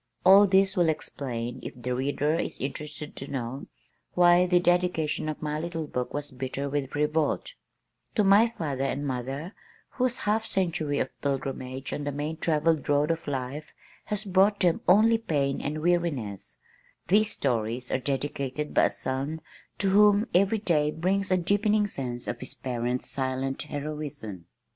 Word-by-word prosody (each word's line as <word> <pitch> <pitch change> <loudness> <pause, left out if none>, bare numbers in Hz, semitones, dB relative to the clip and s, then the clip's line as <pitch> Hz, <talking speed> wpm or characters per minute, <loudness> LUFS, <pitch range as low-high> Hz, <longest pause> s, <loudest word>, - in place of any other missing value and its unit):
All 195 +2 +8
this 195 +1 +3
will 175 -3 +3
explain, 125 -6 -4
if - - -8
the 125 +1 -2
reader 145 +4 0
is 165 - -2
interested 150 +2 -5
to - - -6
know, 130 0 -4 0.5
why 175 0 +6
the 175 0 +4
dedication 175 -4 +1
of 155 - -5
my 150 0 -2
little 165 -1 -3
book 125 -4 -3
was 145 0 -4
bitter 130 +2 -4
with 140 -1 -3
revolt: 150 - 0 0.6
"To 215 - +3
my 205 +4 +6
father 140 -5 -2
and 145 +1 -2
mother, 135 - -4 0.4
whose 255 -2 -1
half 215 +2 +2
century 165 -8 -1
of 130 - 0
pilgrimage 135 -1 -3
on 145 - -3
the 145 - -1
main 150 +3 -3
travelled 155 -2 +1
road 145 +2 +3
of 165 -1 -4
life 140 +2 -4 0.3
has 210 0 -3
brought 195 +2 +3
them 175 -2 +3
only 220 +5 +5
pain 140 -10 -1
and 155 +2 -3
weariness, 130 - -1 0.5
these 210 +3 +4
stories 120 - -1
are 130 - +1
dedicated 140 +1 -3
by - - +5
a - - +3
son 135 +4 -3 0.4
to 195 - +1
whom 205 +1 +5
every 200 +4 +4
day 155 -8 +1
brings 185 +5 0
a 185 - +3
deepening 205 +4 +2
sense 125 -10 -4
of - - -3
his 130 - -2
parents' 125 0 -2
silent 135 0 -2
heroism." 145 - -6
150 Hz, 160 wpm, -27 LUFS, 135-180 Hz, 0.6 s, All